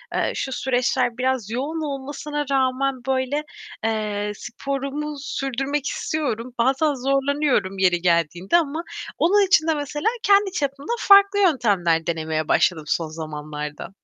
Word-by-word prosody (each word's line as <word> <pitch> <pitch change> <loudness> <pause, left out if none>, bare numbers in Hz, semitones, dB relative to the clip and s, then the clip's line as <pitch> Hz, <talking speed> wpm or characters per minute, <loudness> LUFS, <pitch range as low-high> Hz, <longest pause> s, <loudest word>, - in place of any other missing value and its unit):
Eee, - - +1
şu 265 - -3
süreçler 250 -1 0
biraz 255 -4 -1
yoğun 290 +7 -3
olmasına 290 +1 -4
rağmen 265 0 +1
böyle, 265 +3 0 0.4
eee, 210 -2 -1
sporumu 275 +5 -4
sürdürmek 275 +1 -2
istiyorum. 250 -6 -3
Bazen 270 +5 +2
zorlanıyorum 270 -6 0
yeri 175 -2 +3
geldiğinde 175 - +2
ama 320 0 -1 0.3
onun 395 +4 +4
için 330 -3 +4
de 320 - +3
mesela 295 +3 -3 0.2
kendi 400 -1 +4
çapımda 280 - -3
farklı 400 0 +6
yöntemler 200 - +2
denemeye 160 -2 -2
başladım 160 -1 +2
son 165 0 0
zamanlarda. 150 -1 -6
265 Hz, 125 wpm, -23 LUFS, 205-295 Hz, 0.4 s, farklı